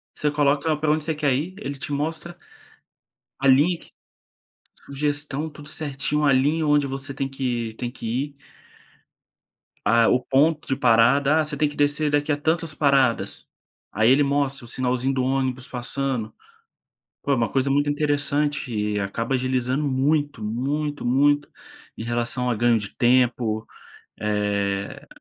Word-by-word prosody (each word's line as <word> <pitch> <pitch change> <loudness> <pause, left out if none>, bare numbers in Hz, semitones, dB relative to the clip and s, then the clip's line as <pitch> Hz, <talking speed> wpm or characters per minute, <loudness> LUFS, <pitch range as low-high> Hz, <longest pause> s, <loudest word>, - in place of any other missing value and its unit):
Você 150 -1 0
coloca 145 +2 +2
pra 150 0 +1
onde 155 0 +1
você 160 -1 -2
quer 145 -3 +1
ir, 165 +8 -3
ele 140 -9 -5
te 145 - -7
mostra, 160 +4 -3 1.0
a 140 - +1
linha 150 +7 +5
que - - -18 0.9
sugestão 145 +1 -2
tudo 150 -1 -12
certinho 150 0 -2
a 140 - +5
linha 150 +4 +2
onde 145 -1 +3
você 135 0 -5
tem 135 -1 -2
que 120 -4 -3
tem 120 +1 -4
que 120 - -9 0.2
ir 145 -1 -12 1.5
ah, 115 +1 +4
o 125 - +3
ponto 150 +4 +2
de 135 - 0
parada, 135 +5 +4
ah, 155 - +1
você 150 -1 -3
tem 150 +1 +1
que 145 - -11
descer 145 +1 +1
daqui 145 +1 +1
a 145 - +1
tantas 160 +1 -1
paradas. 140 -5 +1 0.4
Aí 110 +3 +3
ele 145 +2 +5
mostra 140 -2 -1
o - - -13
sinalzinho 130 +2 -1
do 130 -1 0
ônibus 130 -1 -1
passando. 125 -2 -3 0.9
Pô 140 - 0
é - - +5
uma 115 -3 0
coisa 135 0 0
muito 145 +1 +2
interessante 145 -2 0
e 105 0 -1
acaba 115 +6 -2
agilizando 130 +2 0
muito 140 -1 0
muito 145 +7 -2
muito 145 +4 +2 0.5
em - - -4
relação 120 +1 -1
a 120 - +1
ganho 120 +1 +3
de 105 -2 -8
tempo. 120 -3 +2 0.5
Eh, 100 -1 -2
135 Hz, 155 wpm, -23 LUFS, 125-145 Hz, 1.5 s, linha